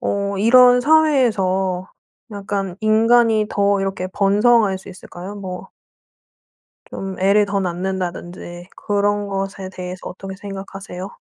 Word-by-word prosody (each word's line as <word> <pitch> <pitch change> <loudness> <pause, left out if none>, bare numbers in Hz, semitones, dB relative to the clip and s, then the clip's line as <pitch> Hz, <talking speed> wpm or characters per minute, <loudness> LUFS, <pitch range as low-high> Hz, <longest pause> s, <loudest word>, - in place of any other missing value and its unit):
어 200 0 -2
이런 250 +3 +6
사회에서 210 -12 +2 0.4
약간 195 -2 -4
인간이 220 0 +3
더 200 -1 +1
이렇게 195 -1 -3
번성할 205 0 +3
수 190 - -14
있을까요? 185 +1 -9
뭐 190 -1 -7 1.2
좀 195 -1 -6
애를 200 +2 +3
더 200 0 -1
낳는다든지 175 -1 -5
그런 205 0 0
것에 195 -1 -4
대해서 185 0 -8
어떻게 190 +1 -8
생각하세요? 195 -1 -8
195 Hz, 260 characters per minute, -20 LUFS, 190-210 Hz, 1.2 s, 이런